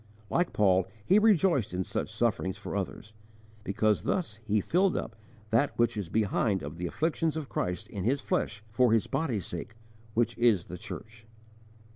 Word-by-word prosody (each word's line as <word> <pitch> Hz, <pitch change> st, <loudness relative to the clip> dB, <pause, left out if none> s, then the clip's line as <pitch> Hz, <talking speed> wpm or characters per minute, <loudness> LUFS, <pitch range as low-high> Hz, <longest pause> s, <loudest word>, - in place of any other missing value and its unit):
Like 175 Hz, 0 st, +2 dB
Paul 95 Hz, -3 st, +3 dB, 0.2 s
he 195 Hz, +3 st, +6 dB
rejoiced 185 Hz, -, +3 dB
in 95 Hz, -, 0 dB
such -, -, -3 dB
sufferings 105 Hz, -5 st, 0 dB
for 105 Hz, -, -6 dB
others, 100 Hz, +2 st, -4 dB, 0.5 s
because 105 Hz, +1 st, +1 dB
thus 160 Hz, -, -1 dB
he 110 Hz, 0 st, +1 dB
filled 180 Hz, -, +2 dB
up 110 Hz, -, -4 dB, 0.4 s
that 120 Hz, +6 st, +2 dB
which 120 Hz, -1 st, +2 dB
is 100 Hz, -5 st, -4 dB
behind 105 Hz, -2 st, +1 dB
of 75 Hz, +3 st, -6 dB
the 90 Hz, +1 st, -2 dB
afflictions 160 Hz, -, 0 dB
of 150 Hz, -4 st, -5 dB
Christ 90 Hz, -1 st, -2 dB
in 100 Hz, -4 st, -5 dB
his 130 Hz, +7 st, +2 dB
flesh 110 Hz, -5 st, -2 dB
for 120 Hz, +1 st, +4 dB
His 115 Hz, -, +3 dB
body's 135 Hz, -, -1 dB
sake 90 Hz, +6 st, -6 dB, 0.4 s
which 115 Hz, 0 st, +2 dB
is 115 Hz, -7 st, +4 dB
the 90 Hz, -, -7 dB
church. 110 Hz, +3 st, -9 dB
110 Hz, 170 wpm, -29 LUFS, 100-135 Hz, 0.5 s, he